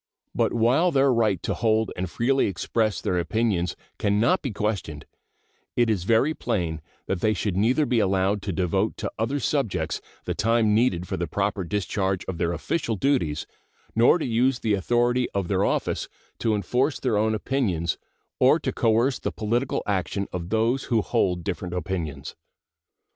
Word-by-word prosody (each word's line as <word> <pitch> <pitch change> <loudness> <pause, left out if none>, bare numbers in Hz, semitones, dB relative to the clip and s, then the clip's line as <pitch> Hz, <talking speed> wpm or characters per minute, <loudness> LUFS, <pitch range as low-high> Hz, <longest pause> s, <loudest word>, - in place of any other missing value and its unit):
But - - +1
while 125 +10 +3
their 135 -4 +3
right 110 -7 +1
to - - -1
hold 110 -2 +1
and 90 0 -3
freely 130 +9 +1
express 105 +3 -1
their 90 - 0
opinions 95 -2 0 0.2
can 100 0 +1
not 125 - +3
be 140 - -3
questioned, 105 -8 -3 0.7
it 120 -2 +3
is 95 -5 -1
very 115 +8 +3
plain 85 - -2 0.2
that 95 -2 -2
they 110 0 +2
should 95 -1 -2
neither 120 +10 +2
be 125 -4 +1
allowed 95 0 +1
to 100 - -3
devote 95 +4 0
to 105 - -3
other 130 +6 0
subjects 95 - -1 0.2
the - - -1
time 115 -1 +2
needed 100 -6 +2
for - - -3
the 85 +1 -2
proper 100 +3 -1
discharge 95 0 -1
of 90 -3 -5
their 85 -1 +1
official 120 - -2
duties 95 - 0 0.5
nor 115 +9 +5
to 165 - -3
use 125 +2 +2
the 110 -2 0
authority 120 +5 +1
of 95 -3 -1
their - - +2
office - - -1 0.3
to 110 -2 +1
enforce 125 - 0
their 125 -5 0
own 110 +1 +2
opinions 100 - -1 0.4
or - - +6
to - - -2
coerce 115 +4 +2
the - - -3
political 120 +4 -1
action 100 0 -1
of 90 -1 -4
those 115 +5 +1
who 115 -4 +1
hold 90 -2 0
different 90 -1 -4
opinions. 85 -4 -4
105 Hz, 170 wpm, -25 LUFS, 95-120 Hz, 0.7 s, or